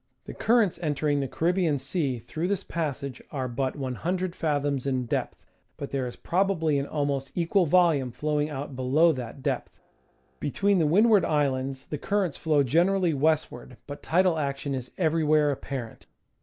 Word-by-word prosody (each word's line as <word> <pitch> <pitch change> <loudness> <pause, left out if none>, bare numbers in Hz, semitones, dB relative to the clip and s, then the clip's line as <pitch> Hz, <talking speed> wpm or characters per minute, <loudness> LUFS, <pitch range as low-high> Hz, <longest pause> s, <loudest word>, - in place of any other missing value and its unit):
The - - -7
currents 225 -5 +2
entering 150 -2 0
the 135 - -1
Caribbean 170 0 +1
Sea 135 -1 -2
through 125 +9 -4
this 200 -1 -1
passage 140 -5 -4
are 130 -3 -2
but 130 +2 -2
100 170 +7 -3
fathoms 145 -4 -1
in 130 -2 0
depth, - - -3 0.3
but 140 - -6
there 135 -2 -1
is 120 - -7
probably 170 -5 +1
an 140 - -3
almost 140 -2 -2
equal 175 +1 +2
volume 160 -6 +3
flowing 150 +4 -1
out 140 -1 -6
below 140 +6 +3
that 130 -1 -6
depth. - - -3 0.6
Between 195 +7 +1
the 160 - +3
Windward 210 +4 +5
Islands 135 -2 -1
the 150 - -5
currents 195 -7 -1
flow 150 -3 +2
generally 175 +5 +2
westward, 150 -3 -1
but 145 0 -8
tidal 175 -1 +2
action 140 -1 -2
is 130 -2 -4
everywhere 155 -3 +3
apparent. 130 -4 -6
150 Hz, 155 wpm, -27 LUFS, 135-170 Hz, 0.6 s, Windward